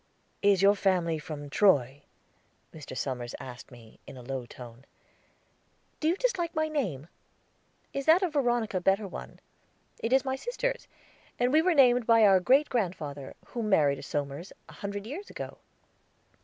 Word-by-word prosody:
"Is 200 -2 +3
your 200 +1 +7
family 180 -5 +1
from 150 -2 -7
Troy?" 140 - +3 0.7
Mr. 145 -4 -9
Somers 125 -3 -4
asked 125 -1 -10
me, 115 -3 -16
in - - -10
a 125 - -10
low 130 -1 -5
tone. 120 +1 -12 1.1
"Do 310 - 0
you 335 - +3
dislike 365 -8 -1
my 315 0 +1
name? 190 - -3 0.9
Is 275 +1 -4
that 340 +4 +6
of 350 -4 -1
Veronica 240 -7 +1
a - - -2
better 195 +3 +2
one? - - -9 0.6
It 230 - -3
is 265 +1 +3
my 265 0 -1
sister's, - - -3 0.5
and 245 +2 +1
we 310 - +6
were 355 0 +2
named 245 -4 +5
by 230 -2 +6
our 195 -2 +6
great 265 +11 +4
grandfather, 160 - -3
who 240 - -4
married 155 -10 +2
a - - -8
Somers, 145 +4 -4 0.2
a - - -13
hundred 200 0 -6
years 315 - -7
ago." - - -8
200 Hz, 165 wpm, -28 LUFS, -, 1.1 s, your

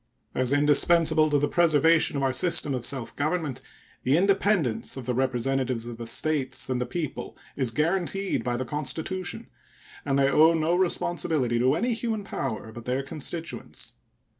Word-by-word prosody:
As 130 0 0
indispensable 155 +2 +4
to 145 - +3
the 145 +1 +1
preservation 160 -1 +3
of 135 - -1
our 135 -1 +1
system 165 -2 +2
of 125 -2 -3
self 130 -3 -4
government, 150 -3 -2 0.4
the 135 +4 +2
independence 190 - +1
of 130 - -6
the 125 - -1
representatives 130 -1 -1
of 120 -1 -7
the 115 0 -7
States 130 0 -1
and 125 -1 -1
the 125 - -2
people 155 +1 -5 0.2
is 130 -4 0
guaranteed 180 - -1
by 120 -1 -1
the 130 - -3
Constitution, 155 +7 -3 0.6
and 135 -1 0
they 135 0 +4
owe 160 +4 +5
no 160 +1 +1
responsibility 165 -8 0
to 130 +4 +3
any 240 +8 0
human 225 -2 -3
power 110 - -4
but 115 0 -10
their 130 +2 -1
constituents. 160 +4 -6
145 Hz, 165 wpm, -26 LUFS, 130-170 Hz, 0.6 s, owe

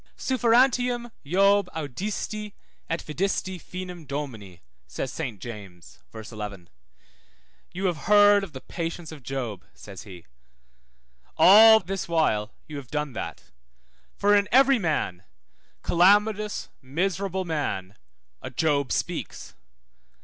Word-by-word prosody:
Sufferentiam 245 -1 +2
Job 195 +4 +3
audiisti, 200 - -4 0.4
et 165 - -2
vidisti 185 +2 -2
finem 180 -4 -8
Domini, 115 - -6 0.2
says 125 - -5
Saint 125 -11 -5
James 100 -7 -10
(v. 110 - -8
11), 105 -5 -7 1.0
You 190 +2 -4
have 165 -6 -2
heard 205 -1 +6
of 195 - -7
the 130 - -8
patience 165 -1 -5
of 155 -3 -10
Job, 120 -7 -5
says 100 -3 -10
he: 90 -5 -12 1.1
all 220 +3 +9
this 195 -2 -5
while 115 -11 +1 0.2
you 150 - -7
have 135 -3 -9
done 150 -2 -3
that, - - -6 0.7
for 205 +1 +3
in 205 0 +2
every 270 +1 +5
man, 155 - -1 0.6
calamitous, 205 +4 +2
miserable 190 +6 -2
man, 105 - -3 0.5
a 130 - -6
Job 140 -1 0
speaks. - - -4
165 Hz, 115 wpm, -25 LUFS, 130-200 Hz, 1.1 s, all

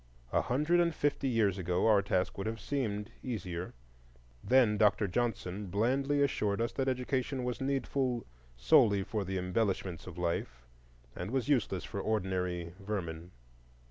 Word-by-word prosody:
A - - +4
hundred 150 +7 +2
and 170 -2 +2
fifty 145 -1 0
years 105 -5 +2
ago 90 0 0
our 105 -3 +5
task 95 -2 0
would 100 +2 -4
have 115 0 -3
seemed 105 -5 -2
easier. 90 -8 -4 0.7
Then 125 -4 +4
Dr. 105 0 +3
Johnson 100 -2 -2
blandly 135 +9 +1
assured 105 -7 0
us 115 0 0
that 135 - -2
education 130 0 -1
was 125 0 -3
needful 135 -2 -1 0.3
solely 100 - +5
for 105 +1 -2
the 95 0 -3
embellishments 90 -1 -1
of - - -8
life, 85 -8 -2 0.5
and 90 +3 -4
was 130 +2 -1
useless 105 -9 +1
for 100 - -4
ordinary 90 -5 -1
vermin. 90 -5 -4
105 Hz, 145 wpm, -32 LUFS, 95-130 Hz, 0.7 s, our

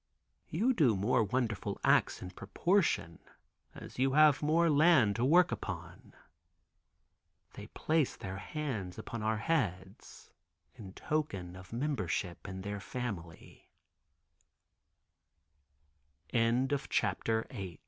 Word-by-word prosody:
You 225 +11 +1
do 135 - +3
more 110 +4 +2
wonderful 110 -1 -2
acts - - +3
in 90 - -7
proportion 100 - 0 0.6
as - - -10
you 135 0 +2
have 150 -2 +5
more 160 +3 +3
land 150 -9 +5
to 115 - 0
work 175 +7 +5
upon." 90 -3 -7 1.4
They - - -9
place 155 -3 0
their 95 0 -6
hands 105 - -4
upon 115 - -6
our 110 0 0
heads 100 - -3 0.4
in 95 -3 -11
token 100 - -3
of 90 0 -12
membership 115 - -2
in 95 -1 -6
115 Hz, 90 wpm, -32 LUFS, 95-155 Hz, 1.4 s, have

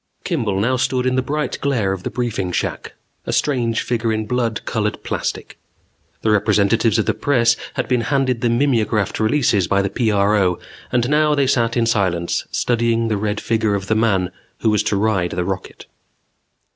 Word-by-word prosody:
_ - - -42
Kimball 115 - 0
stood 130 0 0
now - - +3
in 130 - -1
the 130 - +2
bright 145 0 -3
glare 120 -9 0
of 95 - -6
the - - -4
briefing 110 -5 -2
shack, - - -3 0.3
a - - -1
strange 120 -5 0
figure 115 -2 -1
in 110 0 -1
blood 115 -1 -2
colored 105 -2 -2
plastic. - - -4 0.6
The 110 - +2
representatives 105 +2 +2
of 110 - +1
the - - +1
press 120 -4 +2 0.2
had - - -2
been 125 -2 +1
handed 130 -2 0
the 120 - +2
mimeographed 115 -5 +1
releases 110 - +2
by 100 +1 +2
the 100 - -2
PRO 100 -4 +2 0.3
and 120 -1 +1
now 150 +1 +3
they 140 -1 +2
sat 120 -3 +1
in 115 - +2
silence, 95 -7 0
studying 115 -1 0
the 105 - 0
red 105 +1 -2
figure 110 -2 0
of 95 -1 -3
the 110 - 0
man 95 -5 +1 0.3
who 110 - +2
was 105 -1 +2
to - - +1
ride 100 -4 0
the 90 0 -2
rocket. 95 -1 -5
115 Hz, 185 wpm, -20 LUFS, 100-125 Hz, 0.6 s, now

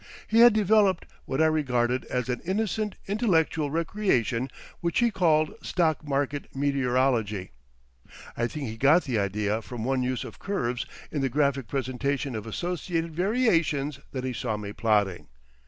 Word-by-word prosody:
He 225 - +3
had 240 -1 +9
developed 210 -3 +3 0.2
what 135 +4 +1
I - - +5
regarded 130 -5 +1
as 125 -1 -2
an 125 -1 -2
innocent 210 +2 -1
intellectual 165 -8 +1
recreation 140 - 0 0.3
which 170 -1 -1
he 240 -1 +3
called 160 -5 +2
stock 160 -4 0
market 145 0 -2
meteorology. 125 - +1 0.8
I 120 - 0
think 140 +1 -5
he 110 0 -6
got 145 +8 +5
the 120 -6 -1
idea 105 +2 -1
from 115 0 -6
one 130 +1 0
use 125 -1 -1
of - - -10
curves 125 -12 -2 0.2
in 145 - -1
the 135 - +1
graphic 140 -2 +1
presentation 135 0 -2
of 110 0 -5
associated 170 - -3
variations 165 - +1
that 130 -2 -4
he 130 -1 -2
saw 110 -2 -2
me 105 -1 -6
plotting. 100 -8 +1
140 Hz, 155 wpm, -27 LUFS, 120-170 Hz, 0.8 s, had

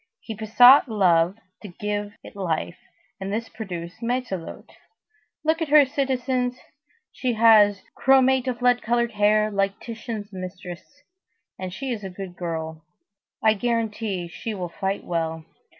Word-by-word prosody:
He 225 - -7
besought 245 +6 +6
Love 180 -3 +3 0.2
to 210 - -8
give 205 +2 -4
it - - -12
life, 170 -2 -3 0.4
and 195 0 -4
this 225 +2 -3
produced 180 -2 -7
Matelote. 235 -8 -4 0.7
Look 320 +2 +1
at 325 - 0
her, 295 -1 +7
citizens! 255 -2 -1 0.5
She 250 -2 -2
has 215 -3 +5
chromate 265 -1 +4
of 250 -1 -3
lead 245 0 +4
colored 235 +1 0
hair, 215 0 +2
like 195 -1 -1
Titian's 225 -3 -7
mistress, 185 +8 -9 0.6
and 185 -1 -5
she 265 +8 -5
is 220 -4 -4
a 190 - -5
good 185 -1 -8
girl. 160 -2 -5 0.6
I 220 -1 +5
guarantee 220 -4 -2
that 170 - -10
she 225 -2 -5
will 180 -3 -4
fight 195 +3 -3
well. 160 -2 -3
210 Hz, 145 wpm, -24 LUFS, 185-245 Hz, 0.7 s, her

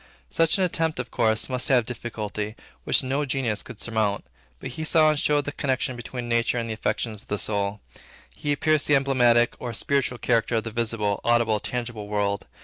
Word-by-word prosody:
Such 165 +2 +3
an 190 - +2
attempt, 165 -5 0
of 125 - -5
course, 110 -2 +1
must 125 -1 0
have 125 -4 +4
difficulty, 110 -3 -5 0.3
which - - +3
no 135 +3 0
genius 130 -6 -1
could 125 -4 -11
surmount. 110 -3 -1 0.3
But - - -6
he 155 - -5
saw 155 -1 +5
and 150 - -1
showed 145 -1 +2
the 145 - -3
connection 130 -2 -1
between 120 0 -6
nature 115 +1 +1
and 115 -1 -2
the 110 - -3
affections 110 -1 -2
of - - -25
the 105 - -2
soul. 100 0 -1 0.5
He 145 0 -2
pierced 155 0 +2
the 150 - +5
emblematic 125 -4 +4
or 120 -2 -5
spiritual 130 +1 0
character 115 -1 +1
of 110 - +1
the 115 - -5
visible, 110 -3 -1
audible, 120 -2 +3
tangible 120 -2 -4
world. 100 -1 -1
120 Hz, 195 wpm, -25 LUFS, 110-135 Hz, 0.5 s, saw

